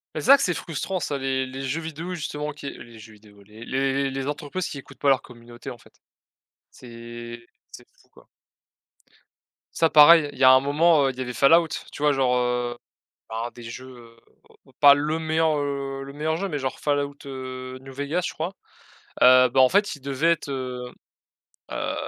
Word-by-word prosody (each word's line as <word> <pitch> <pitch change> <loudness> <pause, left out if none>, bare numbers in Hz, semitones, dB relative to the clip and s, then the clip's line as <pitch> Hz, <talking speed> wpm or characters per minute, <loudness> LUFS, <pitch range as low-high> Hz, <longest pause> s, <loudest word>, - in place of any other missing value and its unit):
Mais - - -2
c'est - - -6
vrai 275 +1 +9
que - - -2
c'est 180 - +1
frustrant 175 +4 -4
ça 145 -3 -3
les 130 -1 -1
les 130 +1 -7
jeux 135 +5 -2
vidéo 160 +3 -6
justement 150 -3 -4
qui 145 -1 -8
les 115 -4 -12
jeux 110 0 -13
vidéo, 105 -1 -19
les 110 +3 -13
le-s 135 +1 -1
les 135 0 -4
entreprises 150 +5 -4
qui - - -7
écoutent 135 -1 -13
pas 140 - +2
leur 135 - +3
communauté, 120 +1 -11
en 120 - -11
fait. - - -21 0.8
C'est 120 0 -10 0.2
c'est - - -13
fou - - -27
quoi. - - -21 1.5
Ça 165 - +3
pareil, 150 0 +7
il - - -14
y 135 - 0
a 130 - +9
un 130 - +7
moment, 145 +1 +3
heu, 135 - 0
il 125 - -17
y - - -4
avait 125 -1 -4
Fallout, 165 +6 +5 0.2
tu 150 - -7
vois, 150 - +4
genre, 130 -2 +1
heu, 125 -1 -1 0.5
un 115 +2 -4
des 120 - -13
jeux 120 0 -11 0.6
pas 140 -1 +8
le 150 +3 -1
meilleur, 160 -1 +1
heu, 140 -1 -4
le 140 - -9
meilleur 155 +2 -2
jeu, 195 +1 -3
mais 150 - -3
genre 135 -2 -4
Fallout, 145 -1 -1
heu, 130 -1 -7
New 135 0 -12
Vegas, 145 +6 -2
je - - -6
crois, 160 +2 -3 0.7
heu, 130 0 +7
bah, 130 +2 +3
en 130 - +6
fait, 205 +2 +1
il 145 - -17
devait 140 +5 +1
être, 155 - -8
heu 125 -2 -5 0.8
heu, - - -3
135 Hz, 200 wpm, -24 LUFS, 125-150 Hz, 1.5 s, vrai